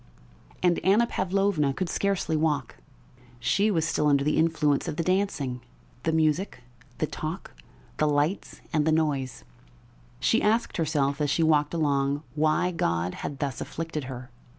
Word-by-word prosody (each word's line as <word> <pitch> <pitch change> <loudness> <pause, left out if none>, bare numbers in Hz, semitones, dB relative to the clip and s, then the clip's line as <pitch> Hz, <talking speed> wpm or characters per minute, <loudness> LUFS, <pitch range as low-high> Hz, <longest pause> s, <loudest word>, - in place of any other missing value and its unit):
And 175 -1 +3
Anna 205 +6 +4
Pavlovna 190 -9 0
could 185 - -2
scarcely 190 -2 0
walk.... 150 -4 0 0.6
She 195 - +2
was 165 -6 +1
still 150 -2 +1
under 140 -1 +3
the 150 +1 +1
influence 160 -2 +2
of 160 - -3
the 165 - -1
dancing, 160 -9 -1 0.4
the 160 - 0
music, 160 -2 0 0.3
the - - +1
talk, - - -6 0.4
the 155 - +2
lights, 150 +5 -1
and 155 -1 +2
the - - +4
noise; 145 -6 0 0.8
she - - +2
asked 225 +3 +1
herself 145 -3 0
as 145 - +1
she 165 +3 +2
walked 155 0 +2
along 140 -2 +1
why 155 +4 +2
God 85 - -1
had 140 - -5
thus 135 -4 -3
afflicted 160 -3 -4
her. 125 -1 -8
155 Hz, 150 wpm, -27 LUFS, 140-170 Hz, 0.8 s, Anna